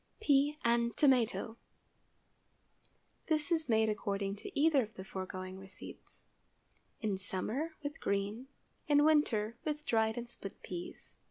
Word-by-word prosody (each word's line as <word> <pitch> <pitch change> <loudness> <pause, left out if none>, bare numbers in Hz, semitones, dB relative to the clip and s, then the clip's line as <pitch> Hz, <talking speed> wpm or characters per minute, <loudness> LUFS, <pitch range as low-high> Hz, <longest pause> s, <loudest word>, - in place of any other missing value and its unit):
PEA 290 -6 +3
AND 235 0 +2
TOMATO. 245 -4 +3 1.7
✠ - - -38
This 310 0 0
is 320 -4 +1
made 220 -1 +4
according 200 -2 -1
to 210 - -5
either 300 -2 +5
of 220 -2 -7
the 190 - -7
foregoing 185 0 -6
receipts, 190 -1 -12 0.8
in 205 -4 -1
summer 225 - -1
with 295 +2 -4
green—in 240 +8 -1
winter 235 -8 +3
with 300 0 -3
dried 220 0 +2
and 240 0 -4
split 200 -4 -9
peas. 175 -1 -7
230 Hz, 125 wpm, -34 LUFS, 200-290 Hz, 1.7 s, either